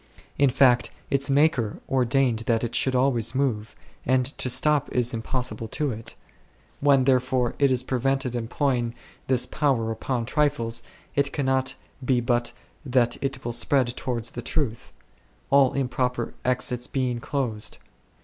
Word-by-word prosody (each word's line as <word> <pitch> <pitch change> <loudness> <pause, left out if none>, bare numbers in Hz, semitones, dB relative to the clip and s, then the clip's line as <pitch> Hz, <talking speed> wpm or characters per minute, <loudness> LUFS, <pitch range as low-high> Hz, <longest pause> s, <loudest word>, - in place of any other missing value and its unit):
In 140 -1 +5
fact, 125 -1 +4 0.2
its 140 +1 +2
Maker 135 -6 +2
ordained 130 -2 +2
that 115 -1 +2
it 120 - -3
should 130 -1 +2
always 125 -2 +2
move, 115 -6 -1 0.3
and 130 0 +2
to 125 - 0
stop 150 +3 +2
is 125 -1 +1
impossible 120 0 -3
to 145 +5 -1
it; 110 0 -8 0.6
when 140 -2 +4
therefore 130 -1 +2
it 140 -2 +4
is 125 -1 +2
prevented 135 0 -1
employing 120 0 -1 0.3
this 125 -2 +2
power 125 -6 0
upon 115 +1 -2
trifles, 120 -5 +1 0.3
it 140 0 +1
cannot 130 -2 0 0.3
be 125 -1 +2
but 120 0 0 0.3
that 125 -3 +2
it 135 -2 -3
will 120 - -2
speed 120 +1 +2
toward 120 -3 -3
the 120 +1 -5
truth, 120 -5 -3 0.6
all 140 -2 +5
improper 125 -2 -1
exits 125 -1 0
being 125 -3 -1
closed. 120 -5 -2
125 Hz, 140 wpm, -25 LUFS, 120-135 Hz, 0.6 s, In